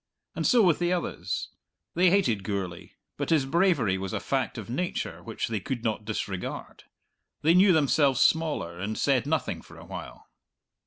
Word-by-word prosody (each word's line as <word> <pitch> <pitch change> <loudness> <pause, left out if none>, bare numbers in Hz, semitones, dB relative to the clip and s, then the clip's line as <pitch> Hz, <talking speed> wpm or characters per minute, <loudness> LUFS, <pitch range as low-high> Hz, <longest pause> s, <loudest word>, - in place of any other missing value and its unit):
And - - 0
so 240 -4 +5
with 175 -5 +3
the 175 0 +1
others; 180 - -2 0.4
they 180 +1 +4
hated 125 - +2
Gourlay, 95 -3 -4 0.2
but - - -3
his 155 -5 +3
bravery 140 - +2
was 95 -1 -4
a - - -1
fact 130 -2 -2
of 110 - -6
nature 155 +10 -3
which - - -4
they 110 -2 -2
could 120 +4 -4
not 110 -2 -2
disregard; 100 -3 -5 0.6
they 160 +3 +5
knew 190 +2 +6
themselves 145 -4 +3
smaller, 150 - +1
and 105 +4 -3
said 140 -2 +1
nothing 160 +1 -1
for - - -15
a - - -12
while. - - -9
135 Hz, 170 wpm, -27 LUFS, 105-170 Hz, 0.6 s, knew